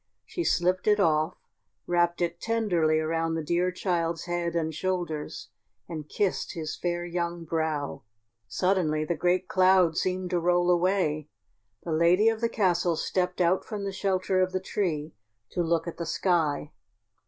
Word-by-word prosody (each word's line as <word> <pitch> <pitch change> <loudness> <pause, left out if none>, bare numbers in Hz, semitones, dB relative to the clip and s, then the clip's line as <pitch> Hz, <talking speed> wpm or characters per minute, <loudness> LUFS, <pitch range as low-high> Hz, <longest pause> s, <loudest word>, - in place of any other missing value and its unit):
She 345 - -3
slipped 185 - +1
it 210 0 +4
off, 160 -2 +2 0.5
wrapped 175 0 +1
it 170 0 -3
tenderly 180 -9 +1
around 165 +1 -1
the 160 - -2
dear 175 +4 +1
child's 170 -3 -1
head 175 -1 -2
and 160 -1 -1
shoulders, 170 -7 -3 0.4
and 155 -3 -7
kissed 200 -3 -1
his 155 -2 -4
fair 175 0 -2
young 170 -1 -3
brow. 160 -3 -2 0.5
Suddenly 155 - +1
the 170 - 0
great 180 +3 +1
clouds 185 -3 +4
seemed 185 0 -2
to 175 - +2
roll 175 +1 +3
away. 175 -4 +1 0.5
The 170 - -4
lady 175 +7 +4
of 225 0 -2
the 230 - +1
castle 175 -5 +1
stepped 180 +3 -1
out 180 +1 +3
from 210 -2 -5
the 200 - -2
shelter 190 -1 0
of 185 0 0
the 185 - +1
tree 165 -6 -2 0.4
to 175 - -1
look 170 0 0
at 170 - -5
the 170 - -4
sky. 160 -5 0
175 Hz, 160 wpm, -27 LUFS, 165-185 Hz, 0.5 s, it